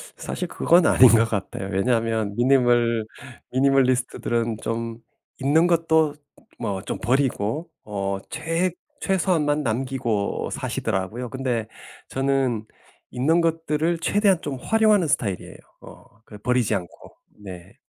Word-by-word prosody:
사실 180 - -5
그건 170 0 +3
아닌 130 - +7
것 115 +1 +5
같아요 95 -2 -4
왜냐하면 110 0 0
미니멀 120 -3 +3 0.5
미니멀리스트들은 130 -3 +1
좀 115 0 -3 0.4
있는 155 +6 +4
것도 160 -3 +2 0.4
뭐 95 -2 -3
좀 - - -5
버리고 130 +3 0 0.2
어 100 -2 -3
최 165 +3 -1 0.3
최소한만 165 - +1
남기고 120 -4 -2
사시더라고요. 110 +7 -3
근데 125 -4 -2 0.4
저는 135 -4 0 0.5
있는 155 +7 +2
것들을 165 0 0
최대한 195 -1 +2
좀 140 -3 -4
활용하는 215 - +3
스타일이에요. 105 -9 -2 0.2
어 - - -14 0.2
그 105 - -11
버리지 120 -1 +1
않고 90 -3 -8 0.3
네. 90 -3 -11
130 Hz, 270 characters per minute, -23 LUFS, 110-160 Hz, 0.5 s, 아닌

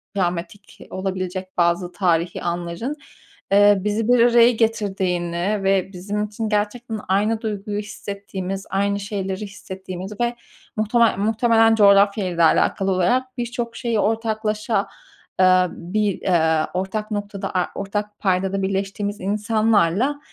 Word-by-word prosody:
travmatik 180 +2 -3
olabilecek 185 0 -4
bazı 175 +1 +1
tarihî 175 -2 0
anların, 175 +10 -3 0.6
eee, 205 0 +6
bizi 210 +1 -1
bir 245 0 +4
araya 240 0 +6
getirdiğini 195 -4 -1
ve 195 0 +1
bizim 205 +3 -3
için 215 +1 -4
gerçekten 215 +2 -2
aynı 210 +4 +1
duyguyu 210 -1 -3
hissettiğimiz, 200 -2 -6
aynı 200 +1 0
şeyleri 195 -1 -4
hissettiğimiz 190 -1 -8
ve 240 0 0 0.4
muhtemel 220 +1 +2
muhtemelen 225 +2 +3
coğrafyayla 200 -3 +4
da 170 - +4
alakalı 195 +4 +2
olarak 250 +9 0
birçok 240 -1 -4
şeyi 235 -3 -1
ortaklaşa, 220 0 0 0.5
ııı, 185 0 +5
bir, 200 +3 -2
eee, 160 -3 +2
ortak 195 +4 -3
noktada, 205 -1 -4
a 180 -1 +1
ortak 205 +1 -4
paydada 190 0 0
birleştiğimiz 200 +2 -2
insanlarla 215 - +1
200 Hz, 120 wpm, -22 LUFS, 185-215 Hz, 0.6 s, eee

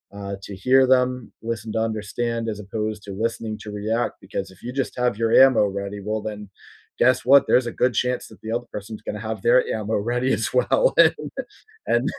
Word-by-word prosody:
uh, 100 -1 -5
to 100 - -7
hear 130 +7 +4
them, 125 -2 +1
listen 115 -1 -4
to 110 - 0
understand, 115 +1 -2
as 105 - -10
opposed 105 +1 -4
to, 100 - -8
listening 115 -2 -3
to 105 - -7
react, 110 +3 -1
because 95 -1 -5
if 95 - -19
you 125 - -5
just 135 -1 -2
have 125 -4 +1
your 115 0 0
ammo 130 -5 +3 0.2
ready, 100 +1 -5
well 110 0 -2
then, 105 -1 -6 0.6
guess 125 -1 +3
what? 140 0 +8
There's 125 -1 +3
a - - -3
good 125 0 +4
chance 125 0 -2
that - - -16
the 110 - -6
other 120 +1 -3
person's 105 +1 -7
gonna 105 - -4
have 110 -1 -3
their 125 +5 +5 0.2
ammo 110 +1 -2 0.2
ready 130 +2 +1
as 110 - 0
well, - - +1 0.2
and - - +3 0.8
and - - +3
110 Hz, 205 wpm, -23 LUFS, 105-125 Hz, 0.8 s, what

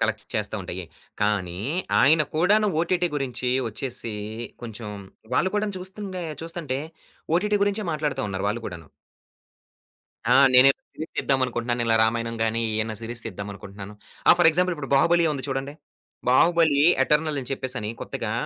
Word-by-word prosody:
Collect - - 0
చేస్తా - - -2
ఉంటాయి. - - -5 0.4
కానీ, 95 -4 0 0.4
ఆయన 155 +3 +6
కూడాను 205 +6 +3
ఓటీటీ 175 +1 +1
గురించి 130 -2 -2 0.2
ఒచ్చేసి 115 0 -5 0.5
కొంచెం 115 -1 -7 0.5
వాళ్ళుని 185 +8 +2
కూడా 210 0 0
చూస్తుంటే 190 -1 -6 0.2
చూస్తుంటే 165 -5 -4 0.6
ఓటీటీ 210 +3 +1
గురించే 205 +1 -1
మాట్లాడుతా 150 -2 -2
ఉన్నారు 95 0 -3
వాళ్ళు 110 +3 -2
కూడాను. 85 -3 -8 1.5
ఆ! - - +6 0.2
నేను 130 +2 +9 0.2
సీరీస్ 160 - -7
తీద్దామనుకుంటున్నాను 125 -3 0 0.2
'రామాయణం' 115 +1 0
గాని 115 +1 +1
ఏయన్నా 110 0 -1
సీరీస్ 120 +1 -6
తీద్దామనుకుంటున్నాను. 100 0 -8 0.3
ఆ! - - +11
ఫర్ 175 - +7
ఎగ్జాంపుల్ 180 +2 +1
ఇప్పుడు 140 -2 -7
'బాహుబలి' 170 +5 +4
ఉంది 135 -3 -4
చూడండి. 135 +1 -3 0.6
'బాహుబలి' 160 +1 +4 0.2
ఎటర్నల్ 150 +1 +1
అని 125 - -9
చెప్పేసని 125 -5 -3
కొత్తగా - - -4
135 Hz, 135 wpm, -25 LUFS, 115-170 Hz, 1.5 s, ఆ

